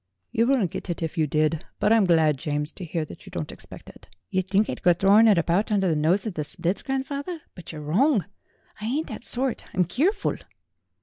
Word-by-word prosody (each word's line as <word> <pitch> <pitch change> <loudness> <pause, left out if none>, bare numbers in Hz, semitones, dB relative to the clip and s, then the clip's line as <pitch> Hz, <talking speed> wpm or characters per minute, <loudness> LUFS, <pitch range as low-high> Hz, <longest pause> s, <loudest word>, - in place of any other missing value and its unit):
"You 230 +1 +2
wouldn't 255 -10 +2
get - - -6
it 170 -1 -3
if 160 - -3
you 155 -2 +1
did, 155 +3 +1 0.2
but 210 - +4
I'm 225 -3 +5
glad, 160 -5 +3
James, 150 +1 -2
to 185 - -9
hear 165 -1 -2
that 115 - -13
you - - -8
don't - - -5
expect - - -11
it." - - -15 0.2
"Yer 185 - +2
think 195 +3 +1
I'd - - -5
go 175 - +5
throwin' 200 +6 +5
it 205 -4 +5
abart 175 +6 +1
under 195 -2 +2
the 160 - +1
nose 165 +7 +2
of 215 - -3
the 155 - -3
splits, 175 +5 -2
grandfawther, 280 +5 -3
but 180 - -10
you're 155 -2 -7
wrong. 210 - +2 0.6
I - - -4
ain't 285 +8 -1
thet - - -7
sort. 255 0 -1
I'm 180 - +3
keerful." 360 - 0
190 Hz, 225 wpm, -25 LUFS, 160-230 Hz, 0.6 s, I'm